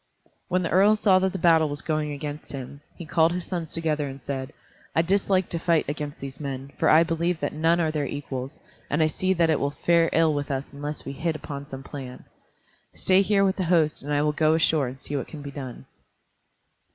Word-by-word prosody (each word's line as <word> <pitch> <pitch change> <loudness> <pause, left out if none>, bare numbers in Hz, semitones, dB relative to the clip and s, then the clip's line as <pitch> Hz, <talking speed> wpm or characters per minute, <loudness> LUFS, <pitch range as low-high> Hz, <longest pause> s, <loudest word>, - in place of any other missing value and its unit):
When 185 0 +1
the 170 - -2
earl 200 +4 +5
saw 195 -3 +4
that 190 0 +1
the 190 - -4
battle 165 -3 +4
was 145 +1 -6
going 155 -2 -1
against 145 +1 -6
him, 140 +1 -7
he 170 - -8
called 165 +1 +3
his 180 -1 -4
sons 170 -4 -4
together 155 -3 0
and 135 0 -7
said, 135 0 -5 0.4
"I 165 - +4
dislike 190 0 +1
to 170 - -2
fight 165 -2 +2
against 145 0 -4
these 135 -1 -8
men, 135 -1 -5
for - - +3
I 160 +2 +7
believe 170 0 -1
that - - -2
none 165 +3 +2
are 160 -2 +1
their 150 -3 -1
equals, 135 -1 -5 0.3
and 150 +3 +2
I - - +4
see 185 +4 0
that 165 -2 +3
it 155 - +2
will 140 - 0
fare 165 +3 +2
ill 160 -1 +3
with 145 0 -3
us 135 0 -3
unless 145 +1 -5
we - - -4
hit 165 +3 -2
upon 140 -2 -7
some 135 -2 -8
plan. 135 -3 -8 0.7
Stay 185 +1 +4
here 200 0 +3
with 190 0 +1
the 185 - -1
host 165 -3 +2
and 145 - -6
I 145 0 +2
will 150 - +2
go 155 +1 +3
ashore 160 -4 +2
and 130 +2 -8
see 145 - -5
what 140 - -2
can 150 -3 -9
be 140 - -6
done." 130 -3 -8
155 Hz, 230 wpm, -25 LUFS, 140-170 Hz, 0.7 s, I